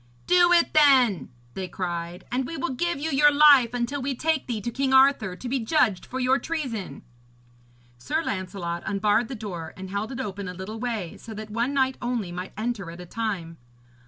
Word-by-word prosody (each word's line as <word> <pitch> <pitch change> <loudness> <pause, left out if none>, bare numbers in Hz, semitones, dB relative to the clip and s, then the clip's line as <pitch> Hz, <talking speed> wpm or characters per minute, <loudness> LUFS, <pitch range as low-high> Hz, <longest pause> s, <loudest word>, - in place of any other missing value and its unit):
'Do 355 -1 +5
it 345 -1 +4
then,' 260 - +4 0.2
they 190 -1 -4
cried, 175 0 -5
'and 250 +1 -1
we 330 - -6
will 260 0 -2
give 345 +3 -1
you 315 +2 -2
your 295 +2 +5
life 285 -5 +6
until 245 +3 -2
we 270 +1 -2
take 315 +2 0
thee 235 -4 -2
to 235 +4 -4
King 265 +1 +1
Arthur, 265 -8 +4
to 250 - -8
be 260 +2 0
judged 225 - +1
for 260 - -5
your 260 +1 +2
treason.' 245 - -4 1.0
Sir 315 - -1
Lancelot 185 - -4
unbarred 210 +3 +1
the 265 - -6
door 175 -8 -7
and 190 0 -8
held 205 +4 -3
it 265 - -6
open 200 -5 -4
a 180 - -6
little 200 +5 -7
way, 225 -8 -4
so 220 - -10
that 215 0 -8
one 235 +5 -1
knight 265 -1 +1
only 240 -7 -2
might 180 +2 -6
enter 215 -5 -3
at 170 +1 -10
a 180 - -8
time. 180 -5 -4
230 Hz, 200 wpm, -25 LUFS, 190-270 Hz, 1.0 s, life